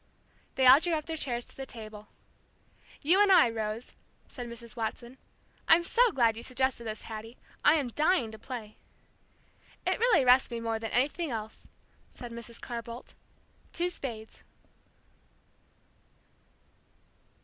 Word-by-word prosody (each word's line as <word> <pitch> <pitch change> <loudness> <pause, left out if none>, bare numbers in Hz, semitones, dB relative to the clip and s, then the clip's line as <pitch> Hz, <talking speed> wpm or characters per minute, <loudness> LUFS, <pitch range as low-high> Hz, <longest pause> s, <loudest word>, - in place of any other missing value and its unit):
They 260 - +2
all 260 +2 +9
drew 345 +1 0
up 305 -1 -3
their 325 - -4
chairs 245 -6 -3
to - - -10
the 270 -1 -7
table. 215 -3 -7 1.0
"You 355 +7 +4
and 410 -1 +5
I, 245 -11 +6
Rose," 220 +1 -4 0.3
said 245 -2 -7
Mrs. 235 -1 -9
Watson. 235 +2 -5 0.5
"I'm 340 +1 +6
so 475 +6 +3
glad 235 - +2
you 230 - -7
suggested 255 -1 0
this, 220 0 -5
Hattie. 225 +2 -8 0.3
I 295 - +6
am 280 -6 0
dying 285 -3 +1
to 220 - -11
play." 230 -5 -8 1.1
"It - - 0
really 455 - +4
rests 255 +1 +5
me 235 -1 -4
more 225 -1 -2
than 225 0 -4
anything 290 +6 0
else," 220 -3 -6 0.4
said 240 -1 -10
Mrs. 235 0 -7
Carr 235 -1 -5
Boldt. 235 +2 -10 0.6
"Two 350 +1 0
spades." 225 -9 -7
240 Hz, 145 wpm, -29 LUFS, 225-285 Hz, 1.1 s, all